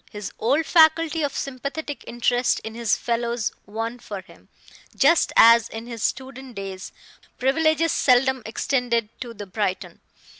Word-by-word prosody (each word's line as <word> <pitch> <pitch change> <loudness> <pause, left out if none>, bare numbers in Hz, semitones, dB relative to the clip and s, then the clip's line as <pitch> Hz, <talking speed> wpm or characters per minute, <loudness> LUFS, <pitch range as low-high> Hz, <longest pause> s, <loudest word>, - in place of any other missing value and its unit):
His 205 -2 -7
old 280 +8 +1
faculty 320 0 +4
of 285 -2 -2
sympathetic 280 +3 -5
interest 245 +1 +1
in 220 - -7
his 230 -2 0
fellows 235 -1 -2 0.2
won 225 +3 -4
for 205 -4 -7
him, 185 - -20 0.5
just 335 - +3
as 230 0 +7
in 225 +1 -7
his 235 -2 -8
student 265 0 -4
days, 195 -1 -7 0.5
privileges 315 +4 +2
seldom 260 0 +3
extended 235 -1 -1
to 235 -3 -7
the 205 -1 -7
Briton. 190 -1 -3
240 Hz, 140 wpm, -23 LUFS, 225-275 Hz, 0.5 s, as